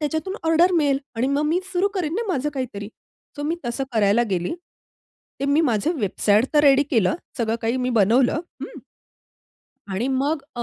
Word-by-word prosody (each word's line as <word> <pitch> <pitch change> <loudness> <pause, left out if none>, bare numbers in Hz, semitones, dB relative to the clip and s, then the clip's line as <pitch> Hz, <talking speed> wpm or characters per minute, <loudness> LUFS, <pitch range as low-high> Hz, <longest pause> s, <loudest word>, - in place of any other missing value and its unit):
त्याच्यातून 315 +6 -2
ऑर्डर 340 +3 +4
मिळेल 285 -5 +2 0.2
आणि 235 +3 0
मग 280 +2 +1
मी 340 +4 +1
सुरू 370 +3 +2
करीन 340 -4 -2
ना, 460 - -1
माझं 295 -4 -1
काहीतरी. 220 -6 -5 0.5
सो 290 - -5
मी 325 +3 -1
तसं 255 +3 -2
करायला 215 +1 +3
गेली. 180 - -1 0.9
ते - - -1
मी 285 +3 +3
माझं 260 - +1
वेबसाईट 210 +2 +2
तर 295 - +6
रेडी 280 -1 +6
केलं. 225 -1 +2 0.2
सगळं 225 0 0
काही 230 +3 0
मी 255 0 -1
बनवलं. 240 +7 +3 0.2
हं - - -8 1.1
आणि 205 +7 -2
मग 275 +3 0
अ, 240 - -2
270 Hz, 175 wpm, -22 LUFS, 225-315 Hz, 1.1 s, तर